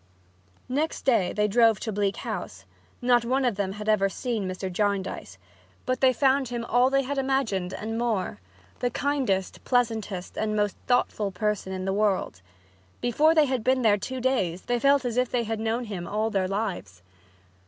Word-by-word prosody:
Next 290 +5 -2
day 215 -9 +3
they 210 0 +1
drove 225 -1 +4
to 220 - -3
Bleak 200 -1 0
House. - - -6 0.4
Not 245 -1 +4
one 260 +3 +1
of 245 - +2
them 195 -1 -2
had 210 +1 -7
ever 205 -2 +3
seen 225 -2 -3
Mr. 185 +1 -4
Jarndyce, 195 - -2 0.5
but 255 0 -1
they 260 -1 +6
found 265 +1 +2
him 235 -1 -4
all 245 +2 +3
they 275 0 +2
had 280 +1 -2
imagined 260 -9 0
and 225 +3 -4
more 215 - -1 0.4
the 245 - 0
kindest, 250 -8 -1
pleasantest 220 -7 -1
and 215 -1 -1
most 205 -1 0
thoughtful 230 -4 +1
person 210 0 -2
in 185 0 -4
the 190 - 0
world. 200 - 0 0.6
Before 300 +7 +3
they 310 -2 +6
had 260 -4 -1
been 255 +1 +2
there 215 -2 +5
two 260 +6 -5
days 195 -9 0
they 245 0 0
felt 275 +1 +3
as 240 -1 -2
if 250 -1 +2
they 240 -1 0
had 225 0 -3
known 225 +2 -1
him 195 -6 -6
all 215 +2 -1
their 195 -3 +1
lives. 190 - -4
225 Hz, 185 wpm, -26 LUFS, 195-250 Hz, 0.6 s, they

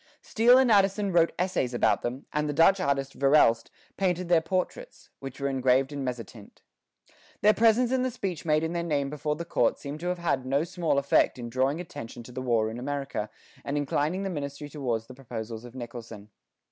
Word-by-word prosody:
Steele 240 +3 +5
and 260 -3 +4
Addison 200 0 +3
wrote 170 -1 +4
essays 170 -9 -1
about - - +2
them, 125 +3 -4
and 150 0 0
the - - -1
Dutch 165 +6 +5
artist 140 -3 -1
Verelst 135 -5 +3 0.3
painted 180 -2 0
their 170 -2 +5
portraits, 190 - -4
which 135 0 -8
were 140 - -1
engraved 130 0 +2
in 140 -1 -4
mezzotint. 115 -4 -7 0.8
Their 210 +1 +6
presence 230 +3 +3
and 260 -1 +1
the 255 - +1
speech 195 -9 -4
made 155 -1 +2
in 160 +1 -2
their 170 - -1
name 145 -4 -1
before 150 0 -2
the 170 +2 -6
court - - +1
seem 145 +1 -7
to 175 - -4
have 180 0 -1
had 150 -7 -1
no 135 +3 +1
small 170 -4 -1
effect 140 -1 +2
in 120 -1 -7
drawing 135 +5 +1
attention 145 -8 -8
to 125 - -12
the 130 +1 -5
war 115 -3 +1
in 115 - -6
America 135 -5 -3 0.3
and 140 +1 -2
inclining 150 +6 -1
the 195 - -2
ministry 145 -2 -5
towards 125 -7 -3
the 130 - -12
proposals 115 -3 -7
of 120 +1 -12
Nicholson. 115 -4 -9
145 Hz, 200 wpm, -27 LUFS, 130-175 Hz, 0.8 s, Their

